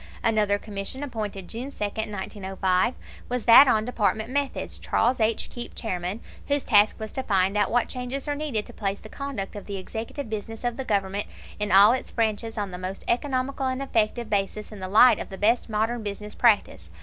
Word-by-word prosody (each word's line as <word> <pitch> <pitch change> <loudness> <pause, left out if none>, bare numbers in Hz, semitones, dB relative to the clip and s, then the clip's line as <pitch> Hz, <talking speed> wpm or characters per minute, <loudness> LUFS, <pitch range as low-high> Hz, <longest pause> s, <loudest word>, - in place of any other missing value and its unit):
Another 210 -2 +2
Commission, 205 +6 -6
appointed 210 -8 -5
June 245 +4 -6
2, - - -18
1905, 195 -1 -1 0.3
was 250 -2 -2
that 245 +4 +9
on 220 -3 +3
Department 220 -1 0
Methods 285 0 -1
Charles 245 +3 +1
H. 220 0 +1
Keep, 240 -1 -7
Chairman 185 -1 -3 0.3
whose 285 -1 +2
task 210 -1 +4
was 220 -1 -5
to 265 - -3
"find 195 -4 +1
out 205 -1 +2
what 245 0 +2
changes 255 +2 -4
are 290 - 0
needed 285 -8 -2
to - - -13
place 200 -1 -2
the 215 - -12
conduct 265 -9 -5
of 205 - -8
the 200 -1 -4
executive 225 +7 -6
business 220 +1 -6
of 240 -1 -1
the 265 - -5
Government 200 -2 -1 0.3
in 210 0 -1
all 200 +3 +8
its 255 - -2
branches 225 0 -1
on 205 -2 -2
the 180 - -6
most 185 +1 -5
economical 265 +1 0
and 260 0 -1
effective 235 -3 0
basis 210 +1 -2
in 210 - -9
the 185 - -4
light 220 +6 +6
of - - -6
the 190 - -8
best 230 +4 +2
modern 225 +2 0
business 210 0 -6
practice." 205 - +2
220 Hz, 195 wpm, -25 LUFS, 200-245 Hz, 0.3 s, that